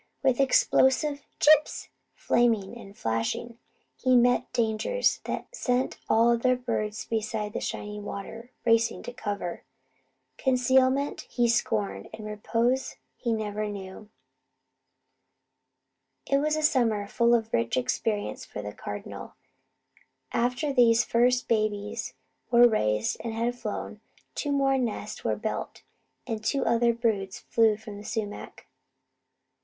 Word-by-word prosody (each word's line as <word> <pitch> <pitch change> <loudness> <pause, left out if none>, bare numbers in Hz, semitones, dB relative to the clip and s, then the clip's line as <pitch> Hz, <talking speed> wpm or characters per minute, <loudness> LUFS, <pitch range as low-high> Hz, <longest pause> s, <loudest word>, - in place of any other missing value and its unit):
With 260 -2 +3
explosive 275 +2 +3 0.2
"chips" 305 0 +4 0.3
flaming 230 -3 +1
and 200 -4 -12
flashing, 115 - -2 0.4
he 255 -1 +2
met 245 0 +3
dangers 235 - +1
that - - -5
sent 250 - -1
all 230 +1 +5
the - - -2
other 255 +1 +3
birds 225 -4 -3
beside 215 -1 -2
the - - -2
shining 210 0 -5
river 225 +4 -7 0.2
racing 230 0 +2
to 245 - -7
cover. 200 -6 -4 0.8
Concealment 260 +2 +2
he 240 -1 +1
scorned; 100 - -1
and 215 -1 -9
repose 230 +5 -1 0.2
he 235 - -2
never 215 -1 -2
knew. 200 +1 -8 2.2
It 275 - +2
was 305 +1 +1
a 310 - -2
summer 230 -8 +2
full 235 +2 +3
of 225 -1 -2
rich 115 +1 +1
experience 205 - -1
for - - -7
the - - -6
Cardinal. - - -7 1.0
After 250 +5 0
these 235 -2 +5
first 245 +1 +2
babies 210 -2 -1 0.3
were 240 0 +7
raised 105 - 0
and 225 -1 -5
had 235 +2 0
flown, 245 - -6 0.3
two 290 - -2
more 270 -1 +2
nests 235 -4 -4
were - - 0
built, - - -5 0.4
and 225 -3 -4
two 275 +4 0
other 235 0 +3
broods 220 -5 -1
flew 225 -2 +3
around 205 -1 -7
the - - -10
sumac. 215 -1 -5
230 Hz, 130 wpm, -27 LUFS, 210-250 Hz, 2.2 s, were